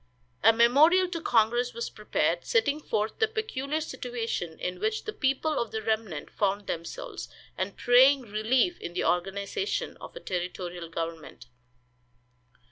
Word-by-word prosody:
A 225 - +8
memorial 290 +11 +5
to 335 -2 -4
congress 240 -1 +2
was 470 - -4
prepared, - - 0
setting 310 -12 +1
forth 215 -6 -2
the 440 - +4
peculiar 315 -10 -2
situation 240 - -4
in 180 0 -3
which 215 +2 -1
the 430 - -5
people 275 +3 0
of 235 - -2
the 220 +1 -4
remnant 215 -8 -2
found 200 0 0
themselves, 170 -2 -5 0.3
and - - -3
praying 260 +3 +6
relief 240 - +1
in 170 - -6
the 180 - -1
organization 200 - -1
of - - -11
a - - -6
territorial 180 - -4
government. 165 -6 -6
225 Hz, 140 wpm, -28 LUFS, 190-285 Hz, 0.3 s, A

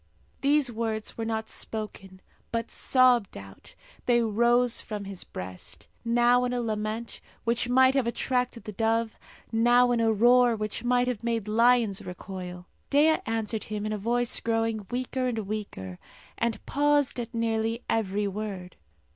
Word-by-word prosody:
These 280 -2 +3
words 220 -1 -3
were 225 - -3
not 220 -1 -2
spoken, 195 -4 -6 0.3
but 230 0 -2
sobbed 250 -5 +3
out. 95 -1 -13 0.3
They 240 -1 +4
rose 235 +2 +2
from 210 -3 -6
his 195 -2 -7
breast 90 0 -8 0.2
now 240 +1 +4
in 250 0 -1
a 245 - 0
lament 220 0 -3 0.2
which 235 +1 0
might 260 +1 +5
have 270 -4 +1
attracted 250 0 -1
the 215 - -6
dove, 225 +1 0 0.4
now 240 +2 +4
in 240 - +2
a 225 -1 +3
roar 240 +2 +5
which 215 0 -4
might 245 0 +2
have 240 -3 -3
made 230 -3 -1
lions 230 -2 +3
recoil. 180 -1 -7 0.2
Dea 305 +3 +4
answered 225 -1 -2
him 210 -1 -4
in 215 - -2
a - - -2
voice 240 +3 0
growing 225 -2 -1
weaker 255 +1 -2
and 240 -2 -2
weaker, 95 - -5 0.4
and 235 -1 -2
pausing 290 -3 +2
at 230 -1 -7
nearly 225 0 -1
every 205 -2 0
word. 195 -3 -6
230 Hz, 155 wpm, -27 LUFS, 215-245 Hz, 0.4 s, might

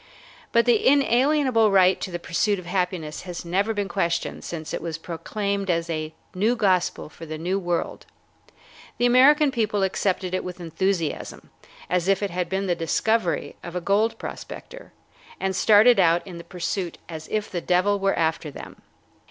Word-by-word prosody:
But 235 0 +4
the 240 -3 +3
inalienable 265 -3 +3
right 190 -2 +4
to - - -3
the 175 - -4
pursuit 185 +5 0
of 185 - -9
happiness 180 -4 -2
has 175 -1 -7
never 195 +6 0
been 205 -2 -2
questioned 170 -4 -2
since 160 -2 -6
it - - -3
was 165 -1 -4
proclaimed 200 +4 -3
as 170 -1 0
a 155 -1 -3 0.2
new 215 +6 +1
gospel 190 -6 +1
for 165 +2 -11
the 155 0 -5
New 180 +5 -1
World. 175 -2 -3 0.9
The 240 - +2
American 275 +4 +5
people 215 -5 0
accepted 190 -1 -1
it 185 - -1
with 180 0 -7
enthusiasm, 170 0 -3 0.4
as 180 0 0
if 195 +1 +2
it 200 - -2
had 180 0 -2
been 195 +1 -1
the 180 - +1
discovery 175 +2 0
of 175 0 -8
a - - 0
gold 205 +5 +1
prospector, - - -9 0.5
and 190 0 -1
started 215 +4 +6
out 170 -1 +3
in 180 -3 -9
the - - -9
pursuit 180 0 -4
as 160 -2 -8
if 215 -1 -2
the 175 - -3
devil 185 +4 +2
were 195 0 +1
after 160 -1 0
them. 140 - -10
185 Hz, 175 wpm, -24 LUFS, 170-210 Hz, 0.9 s, started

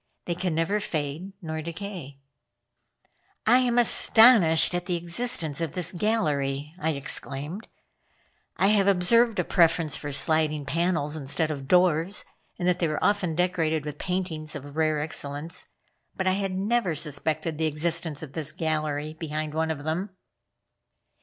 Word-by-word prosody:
They 175 - -1
can 180 -1 -2
never 165 +6 +1
fade 160 +1 -4
nor 160 -1 -4
decay." 170 -4 -7 1.3
"I 245 +3 +6
am 245 -1 +1
astonished 220 -8 +6
at 175 0 -3
the 180 - 0
existence 170 - -2
of 165 -3 -3
this 180 -2 -2
gallery," 150 -9 -1
I 160 - 0
exclaimed. 140 +6 -5 0.9
"I 195 - +3
have 205 -2 +3
observed 220 +5 +3
a - - +2
preference 165 -3 +2
for 145 - -6
sliding 150 +1 +2
panels 160 0 0
instead 155 +2 +1
of 140 -3 -6
doors, 180 +2 +3 0.3
and 175 - -2
that 180 -1 +2
they 170 - +1
were 155 -1 -2
often 195 -6 +1
decorated 165 -3 0
with 150 -1 -6
paintings 175 -5 -3
of 145 0 -8
rare 155 -1 +1
excellence, 150 +2 -3 0.5
but 190 - -2
I 185 - +3
had 195 -1 -2
never 205 -3 0
suspected 155 +1 -2
the 160 - +1
existence 160 0 -1
of 140 -3 -9
this 160 -4 -3
gallery 155 -1 -2
behind 155 -1 -4
one 160 +1 0
of 150 -3 -4
them." 165 +6 -2
160 Hz, 150 wpm, -26 LUFS, 150-185 Hz, 1.3 s, I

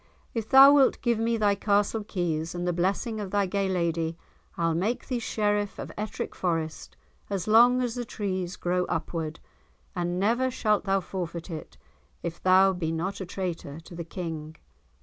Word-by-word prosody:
"If 225 -2 -3
thou 270 +1 +9
wilt 275 -2 +4
give 235 -2 +2
me 230 +1 +1
thy 205 -2 +3
castle 205 +2 +1
keys 170 -5 -2
and 175 0 -2
the 175 - +1
blessing 195 +6 -1
of 200 -2 -4
thy 200 +1 +1
gay 195 +1 -1
lady, 165 -2 -1 0.4
I'll 165 -1 +1
make 200 +9 -1
thee 250 -2 -1
Sheriff 205 -2 -1
of - - -6
Ettrick 210 0 -4
Forest 165 -3 -3 0.3
as 195 -2 -2
long 245 +3 +6
as 240 -2 -1
the 245 0 -3
trees 190 -5 -3
grow 180 +1 0
upward, 165 -1 -3 0.6
and 175 0 -1
never 235 +6 +2
shalt 215 -4 +1
thou 195 0 +2
forfeit 175 -2 -5
it, 160 - -8 0.5
if 170 -1 -5
thou 190 +1 +5
be 165 -3 -2
not 180 +5 -3
a 190 - -5
traitor 170 -6 -4
to 175 - -13
the 170 0 -5
King." 160 -3 -6
190 Hz, 175 wpm, -27 LUFS, 170-215 Hz, 0.6 s, thou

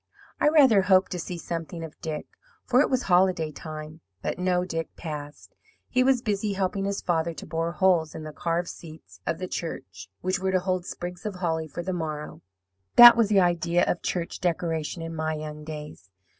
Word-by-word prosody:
I 295 - +4
rather 270 -10 +6
hoped 190 0 +3
to 180 - -3
see 175 +1 -5
something 165 -1 -5
of 160 -1 -10
Dick, 155 -2 -4 0.4
for 255 +1 +4
it - - +2
was 260 -1 +1
holiday 180 -4 +3
time; 155 +1 -8 0.2
but - - -2
no 180 0 +1
Dick 165 -3 -3
passed. 150 -3 -8 0.4
He 255 0 +3
was 255 -2 +3
busy 205 -1 -1
helping 195 0 -1
his 200 0 -2
father 165 -1 0
to - - -8
bore 165 +1 -2
holes 175 -4 +2
in 155 - -6
the 155 0 -7
carved 170 +3 -1
seats 160 -1 -12
of - - 0
the 185 - -4
church, 100 - -6
which 185 +1 0
were 190 0 -1
to 185 - +4
hold 185 -1 -2
sprigs 175 0 -6
of 210 -3 -4
holly 165 -3 -1
for 170 +3 -6
the 185 +1 -2
morrow 150 - -5 0.5
that 240 0 +11
was 230 -3 +3
the 200 -2 +5
idea 175 0 +2
of 175 - -1
church 170 -2 -3
decoration 165 -1 -2
in 165 0 -5
my 155 0 -2
young 150 0 -7
days. 150 -9 -8
175 Hz, 200 wpm, -26 LUFS, 160-190 Hz, 0.5 s, that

